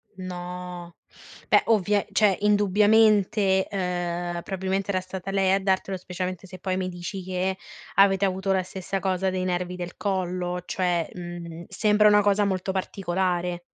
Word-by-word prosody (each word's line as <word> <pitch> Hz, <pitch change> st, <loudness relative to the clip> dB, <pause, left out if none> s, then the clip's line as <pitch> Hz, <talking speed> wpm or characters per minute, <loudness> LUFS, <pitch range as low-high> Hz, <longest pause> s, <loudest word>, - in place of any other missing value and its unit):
No, 180 Hz, -1 st, -7 dB, 0.5 s
beh -, -, +5 dB
ovvia 205 Hz, -2 st, +3 dB
cioè 205 Hz, -3 st, +4 dB
indubbiamente, 205 Hz, -1 st, +4 dB
uhm, 175 Hz, -2 st, -2 dB
probabilmente 190 Hz, +1 st, -2 dB
era 185 Hz, -2 st, +1 dB
stata 185 Hz, 0 st, -7 dB
lei 195 Hz, -1 st, +2 dB
a 195 Hz, -, +3 dB
dartelo, 190 Hz, 0 st, 0 dB
specialmente 185 Hz, 0 st, -5 dB
se 185 Hz, 0 st, -10 dB
poi 185 Hz, 0 st, -2 dB
mi 185 Hz, 0 st, -2 dB
dici 180 Hz, +2 st, -6 dB
che 185 Hz, +1 st, -1 dB, 0.4 s
avete 195 Hz, 0 st, +5 dB
avuto 190 Hz, 0 st, -1 dB
la 190 Hz, -1 st, +2 dB
stessa 190 Hz, +1 st, -4 dB
cosa 190 Hz, 0 st, 0 dB
dei 185 Hz, 0 st, -2 dB
nervi 180 Hz, 0 st, -2 dB
del 175 Hz, -1 st, -6 dB
collo, 180 Hz, -2 st, -2 dB
cioè, 175 Hz, -3 st, 0 dB
mhmm, 175 Hz, -1 st, -7 dB
sembra 210 Hz, -1 st, +3 dB
una 205 Hz, 0 st, +6 dB
cosa 205 Hz, 0 st, +3 dB
molto 190 Hz, -1 st, -1 dB
particolare. 180 Hz, -2 st, -1 dB
185 Hz, 150 wpm, -25 LUFS, 180-195 Hz, 0.5 s, una